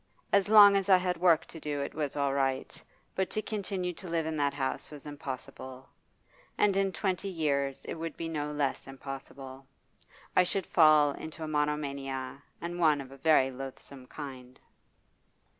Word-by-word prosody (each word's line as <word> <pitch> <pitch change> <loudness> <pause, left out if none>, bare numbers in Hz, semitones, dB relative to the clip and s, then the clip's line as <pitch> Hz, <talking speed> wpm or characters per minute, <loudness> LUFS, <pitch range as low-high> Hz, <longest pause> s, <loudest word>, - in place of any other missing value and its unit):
As 200 0 +4
long 205 -2 +9
as 195 0 0
I 190 - +8
had 180 -1 -1
work 165 -2 +4
to 165 - -10
do 150 -2 -3
it 140 - -4
was 150 -3 -3
all 140 -1 +1
right; 135 -1 -1 0.3
but 190 0 -1
to - - -1
continue 190 -4 -3
to 185 - -10
live 165 -1 -1
in 160 0 -2
that 140 -1 +1
house 135 -2 -3
was 150 -1 -10
impossible. 130 -2 -8 0.7
And 205 -2 +3
in 195 0 +2
twenty 185 +2 -2
years 140 -6 -1
it - - -4
would 165 -1 -6
be 165 - -4
no 150 -2 -3
less 145 -2 -2
impossible. 135 0 -9 0.7
I - - +7
should 185 +1 0
fall 155 -3 +5
into 160 +3 -8
a - - -3
monomania, 140 -3 -2 0.2
and 175 +1 -5
one 155 -4 +4
of 135 -1 -8
a 135 - -11
very 135 -2 +4
loathsome 135 0 -9
kind. 130 -4 -9
150 Hz, 175 wpm, -30 LUFS, 135-175 Hz, 0.7 s, long